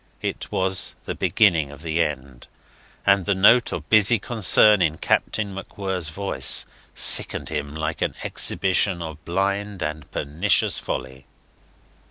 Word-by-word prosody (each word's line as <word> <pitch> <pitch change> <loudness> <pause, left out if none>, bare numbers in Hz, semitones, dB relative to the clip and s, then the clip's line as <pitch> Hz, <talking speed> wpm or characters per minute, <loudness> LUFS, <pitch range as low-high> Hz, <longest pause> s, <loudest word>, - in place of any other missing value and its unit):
It - - -5
was 95 0 0
the - - -4
beginning 85 -9 +1
of 70 +2 -13
the 80 0 -1
end; 65 -4 -7 0.6
and 100 -2 +2
the 100 - +1
note 115 +6 +4
of - - -6
busy 110 +2 +4
concern 105 -1 +4
in 80 -2 0
Captain 100 +4 -2
MacWhirr's 95 -3 -4
voice 80 -6 +1 0.3
sickened - - +4
him 75 -1 -5
like 80 0 -5
an - - -2
exhibition 95 -2 +1
of 80 -2 -10
blind 100 +1 -3
and 75 -1 -6
pernicious 80 +8 0
folly. 65 +1 -7
90 Hz, 135 wpm, -22 LUFS, 75-100 Hz, 0.6 s, note